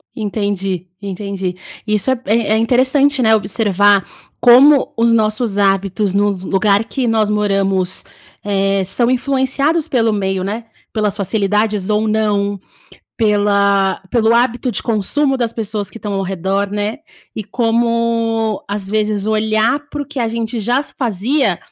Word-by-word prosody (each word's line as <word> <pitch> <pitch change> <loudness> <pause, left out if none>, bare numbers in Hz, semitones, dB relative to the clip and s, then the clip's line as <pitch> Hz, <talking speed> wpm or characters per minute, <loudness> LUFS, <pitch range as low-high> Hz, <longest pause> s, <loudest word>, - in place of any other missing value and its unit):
Entendi, 200 -4 -3
entendi. 195 -2 -4 0.3
Isso 215 +5 0
é - - +2
p 235 -5 -11
é 225 -2 +2
é - - +3
interessante, 260 +4 +2
né, 220 -2 +5
observar 205 -1 +2 0.4
como 265 +4 +6
os 230 0 +3
nossos 215 -1 0
hábitos 195 0 +1
no 205 0 +2
vu 185 0 -8
lugar 200 +2 +2
que 255 +2 -3
nós 220 -2 +1
moramos, 195 -3 0 0.4
eh, 195 -1 0
são 235 +6 -1
influenciados 275 +4 0
pelo 230 -4 +1
meio, 190 -2 -1
né. 215 +4 -4 0.3
Pelas 210 -2 0
facilidades 210 0 -1
ou 210 +1 +1
não, 205 -2 0 0.6
pela 200 -2 +2
pelo 225 -2 +2
hábito 245 +1 +1
de - - -3
consumo 265 +6 0
das 235 -2 -2
pessoas 210 -3 -4
que 225 - -11
estão 210 -2 -5
ao 195 - -1
redor, 195 +2 -2
né. 205 +4 -2 0.4
E 215 - -4
como, 230 -1 0
às 200 -1 -4
vezes, 210 -1 -1
olhar 220 +4 +1
para 290 - -4
o - - -10
que 285 -3 -5
a 230 - 0
gente 230 0 -3
já 245 +6 +1
fazia 235 - -1
215 Hz, 150 wpm, -17 LUFS, 200-235 Hz, 0.6 s, como